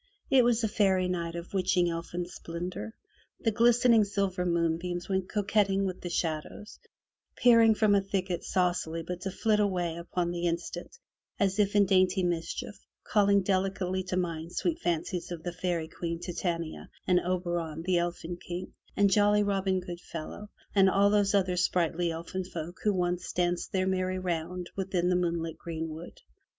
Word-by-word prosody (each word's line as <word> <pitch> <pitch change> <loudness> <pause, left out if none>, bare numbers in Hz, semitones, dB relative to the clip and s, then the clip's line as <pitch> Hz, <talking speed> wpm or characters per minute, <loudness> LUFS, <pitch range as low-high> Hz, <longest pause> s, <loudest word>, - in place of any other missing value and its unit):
It 265 -2 +6
was 240 -1 +2
a - - +3
fairy 190 -3 +2
night 170 -2 -2
of 170 +2 -7
witching 185 -2 +2
elfin 170 +1 -3
splendor; 175 +5 -6 0.4
the 225 - +1
glistening 235 0 +5
silver 195 -3 -1
moonbeams 170 +1 -1
went 190 -1 -1
coquetting 205 -1 +1
with 185 -1 -4
the 175 - -4
shadows, 165 +5 -3 0.6
peeping 230 -2 +6
from 210 -1 +3
a 200 - +4
thicket 190 -3 -2
saucily 175 -3 0
but 180 +1 -5
to 195 - -2
flit 210 +2 +1
away 180 -5 0
upon 175 0 -2
the 175 0 -1
instant 175 - -4 0.4
as 195 0 +1
if 205 0 +2
in 205 -1 +6
dainty 185 0 +3
mischief, 170 -2 -3 0.2
calling 200 -2 +3
delicately 190 -1 0
to 185 0 -2
mind 170 -2 -3
sweet 335 -1 -1
fancies 175 - -2
of 165 -2 -6
the 175 - -4
Fairy 175 -2 -2
Queen, 165 0 -4
Titania, 170 -2 -3 0.2
and 180 -1 +4
Oberon, 175 -3 -2
the 180 0 +2
Elfin 175 0 -3
King, 180 +1 -6 0.2
and 200 -1 +4
jolly 205 +1 +4
Robin 195 -2 +1
Goodfellow, 175 +2 -7 0.2
and 195 -1 +5
all 200 +1 +4
those 205 -1 +3
other 185 -2 +2
sprightly 175 -1 +1
elfin 170 +3 -4
folk 175 0 -7
who 210 - +3
once 180 -2 -1
danced 175 0 0
their 185 -1 +1
merry 185 0 0
round 180 0 -3
within 185 -2 0
the 180 - +3
moonlit 170 -2 -1
greenwood. 160 0 -6
180 Hz, 160 wpm, -29 LUFS, 170-195 Hz, 0.6 s, It